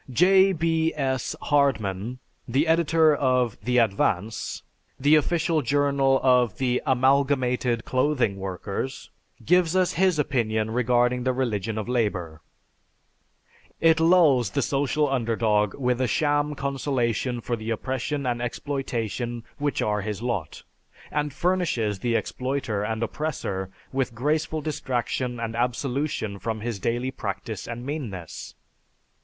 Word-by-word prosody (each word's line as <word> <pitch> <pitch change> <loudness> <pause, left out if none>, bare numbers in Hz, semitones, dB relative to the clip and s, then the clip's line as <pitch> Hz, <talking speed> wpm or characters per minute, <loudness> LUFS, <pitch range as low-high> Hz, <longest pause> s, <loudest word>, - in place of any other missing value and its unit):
J. 190 +8 +5
B. 165 -1 +1
S. 130 -3 -1
Hardman, 125 -6 +1 0.3
the 135 +6 +2
editor 160 -1 +4
of 125 -4 +1
The 125 0 0
Advance, 105 -2 0 0.4
the 145 +3 +4
official 160 +1 +2
journal 140 -2 +2
of 125 -5 +3
the 125 -1 0
Amalgamated 130 -2 +2
Clothing 130 -6 +1
Workers, 95 +6 -5 0.3
gives 180 +2 +3
us 185 -1 +2
his 185 -2 +2
opinion 110 -6 0
regarding 125 +1 +2
the 130 0 +1
religion 110 -4 -2
of 110 - -3
labor. 95 -10 -1 1.4
"It 160 0 +4
lulls 160 - +5
the 135 +7 -1
social 145 +3 +1
underdog 110 -5 +1
with 125 -2 0
a 130 - +2
sham 145 +3 +1
consolation 130 -3 -1
for 120 +1 -2
the 110 0 -6
oppression 130 +5 -2
and 120 -1 -1
exploitation 120 -3 -3 0.2
which 145 0 0
are 105 -1 0
his 105 +2 -4
lot, 100 -11 -3 0.5
and 150 0 -1
furnishes 150 - 0
the 120 +3 0
exploiter 125 -5 -2
and 110 +2 -2
oppressor 115 -9 -3 0.2
with 130 -3 -1
graceful 155 +4 0
distraction 125 -4 -2
and 115 -1 -3
absolution 125 -3 -2
from 110 +2 -3
his 115 -2 -3
daily 120 +6 -1
practice 110 -3 -5
and 120 +1 -6
meanness. 115 - -6
125 Hz, 125 wpm, -25 LUFS, 115-145 Hz, 1.4 s, J